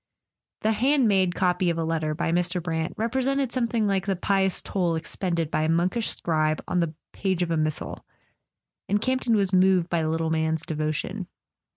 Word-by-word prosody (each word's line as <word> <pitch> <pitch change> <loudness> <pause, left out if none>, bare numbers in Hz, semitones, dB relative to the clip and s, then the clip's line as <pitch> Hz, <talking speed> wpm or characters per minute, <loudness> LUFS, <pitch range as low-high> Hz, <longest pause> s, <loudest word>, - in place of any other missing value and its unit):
The 220 - +2
"hand 260 +3 +3
made" 190 -3 +2
copy 180 -1 +1
of 170 - -1
a 165 - 0
letter 160 -1 -1
by 165 0 -1
Mr. 180 +1 +1
Brant 160 -1 -3
represented 265 +3 0
something 235 -3 0
like 195 -1 0
the 195 - +1
pious 190 +1 +1
toil 175 -4 -1
expended 165 -1 -2
by - - +1
a 155 - +1
monkish 180 +7 +1
scribe 155 -2 0
on 180 - 0
the 165 -2 -1 0.2
page 185 -3 0
of 170 - -3
a 165 - +1
missal; 155 -1 -2 0.9
and 205 +1 +2
Camp 255 +3 0
ton 230 -2 +2
was 195 -2 +1
moved 185 -2 +4
by 170 -1 +2
the 155 - 0
little 160 0 -1
man's 160 0 0
devotion. 155 -1 -3
180 Hz, 190 wpm, -25 LUFS, 160-200 Hz, 0.9 s, moved